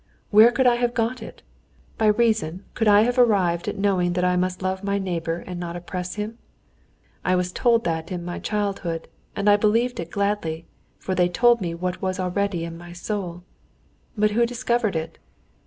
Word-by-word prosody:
"Where 220 +3 +8
could 260 +1 +1
I 240 -1 +5
have 240 0 0
got 235 +1 -1
it? 220 - -10 0.6
By 220 - +3
reason 210 -5 +1
could 225 - 0
I 205 0 +7
have 245 +3 +1
arrived 190 -8 +3
at - - -3
knowing 190 -3 +1
that 180 0 0
I 180 0 +2
must 180 +1 -1
love 190 +1 -2
my 200 0 0
neighbor 170 -3 -3
and 180 -1 -6
not 170 -1 -5
oppress 180 +1 -5
him? 215 +3 -5 0.8
I 185 - +2
was 180 0 0
told 230 +3 +2
that 160 0 -2
in 175 -1 -4
my 175 - -4
childhood, 195 -6 -2 0.3
and 200 - -1
I 205 0 +7
believed 230 +4 +1
it 170 0 -5
gladly, 200 -5 -2 0.3
for 190 - -3
they 180 -1 +2
told 235 +5 +4
me 170 -2 -3
what 180 +1 -3
was 185 0 -2
already 185 -1 -1
in 165 0 -8
my 175 0 -10
soul. 175 -1 -5 0.7
But 210 0 +3
who 235 +3 +2
discovered 235 -4 0
it? 160 0 -4
190 Hz, 190 wpm, -23 LUFS, 175-220 Hz, 0.8 s, Where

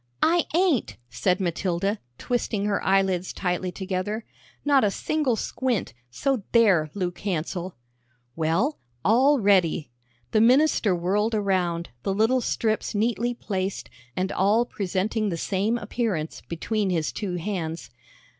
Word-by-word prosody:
"I 340 +1 +3
ain't," 345 - +2
said 185 0 +1
Matilda, 185 +3 -1 0.2
twisting 225 -4 -1
her 205 -1 0
eyelids 190 -2 +2
tightly 180 0 -2
together; 195 +4 -3 0.4
"not 280 -3 +4
a 210 - +4
single 285 +4 0
squint, 235 - -2 0.2
so 250 - 0
there, 195 -10 +5
Luke 180 -3 -3
Hansell." 180 -1 -3 0.6
"Well, 170 - 0 0.3
all 260 +8 +5
ready!" 185 - +2 0.4
The 215 - +4
minister 245 -5 +4
whirled 205 +6 0
around, 180 -5 0
the 195 +9 -1
little 225 +5 +3
strips 220 -2 -1
neatly 235 +3 0
placed, 190 -4 -3 0.2
and 185 +1 -1
all 210 +5 +3
presenting 205 +1 -1
the 170 - -2
same 200 +7 0
appearance, 205 -8 -2
between 200 +4 -1
his 165 -4 0
two 195 -4 -3
hands. 170 - -4
200 Hz, 125 wpm, -25 LUFS, 180-230 Hz, 0.6 s, there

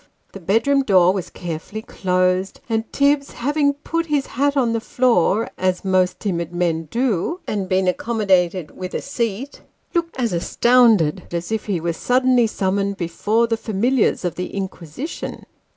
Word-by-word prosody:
The 195 - -9
bedroom 225 +10 +2
door 185 -7 +4
was 190 -3 -4
carefully 175 +5 -6
closed, 185 0 0
and 225 -1 -2
Tibbs, 280 0 +2
having 285 +3 +1
put 330 +3 -3
his 290 -3 +1
hat 285 +3 0
on 240 -4 +2
the 230 - 0
floor 230 -4 +2
(as 185 0 0
most 185 -1 +2
timid 170 -5 -2
men 170 -2 -1
do), 245 - 0
and 195 -3 -3
been 185 0 +2
accommodated 185 -5 +1
with 185 0 -6
a - - -1
seat, 240 0 -3 0.3
looked 335 -2 -1
as 235 -6 0
astounded 205 -3 +3
as 170 +3 -4
if 220 -1 -2
he 195 -4 0
were 170 +1 -1
suddenly 250 +4 +3
summoned 200 -1 -1
before 205 +7 0
the 230 -1 -1
familiars 220 0 +1
of 175 - -1
the 180 - -5
Inquisition. 190 - -6
205 Hz, 155 wpm, -21 LUFS, 180-250 Hz, 0.3 s, door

